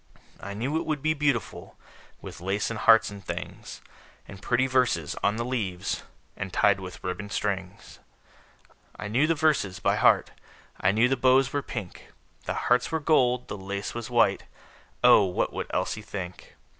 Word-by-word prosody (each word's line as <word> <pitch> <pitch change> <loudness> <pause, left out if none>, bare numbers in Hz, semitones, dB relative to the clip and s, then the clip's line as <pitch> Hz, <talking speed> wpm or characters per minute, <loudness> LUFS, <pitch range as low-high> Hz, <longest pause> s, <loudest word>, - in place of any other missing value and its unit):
I 100 - -7
knew 130 +9 -1
it - - -2
would 150 -3 -2
be 155 0 +2
beautiful, 145 -7 -2 0.5
With - - -9
lace 100 +4 -1
and 110 - -4
hearts 115 -1 +5
and 100 -1 -10
things, - - -7 0.5
And 100 -1 -11
pretty 125 +4 +1
verses 125 - +1
on 105 - +2
the 115 +1 -3
leaves, 100 -7 -2 0.3
And 95 -2 -5
tied 100 0 +3
with 90 -2 -9
ribbon 100 +3 -4
strings. 100 -2 -4 1.0
I 105 - -6
knew 125 +9 +2
the 165 - +2
verses 145 -12 +1
all - - -15
by - - +2
heart; - - +4 0.5
I 95 - +2
knew 110 +4 +3
the 135 +1 0
bows 130 +1 +3
were 145 - 0
pink; 105 -9 -8 0.3
The - - -2
hearts 125 0 +2
were 160 - 0
gold; 125 -5 +2
the 105 - -6
lace 100 +1 -5
was 120 0 -6
white 120 -2 +2 0.6
Oh, - - +7
what 90 -1 -1
would - - -4
Elsie 105 - -2
think! 95 -4 -8
110 Hz, 175 wpm, -26 LUFS, 100-130 Hz, 1.0 s, Oh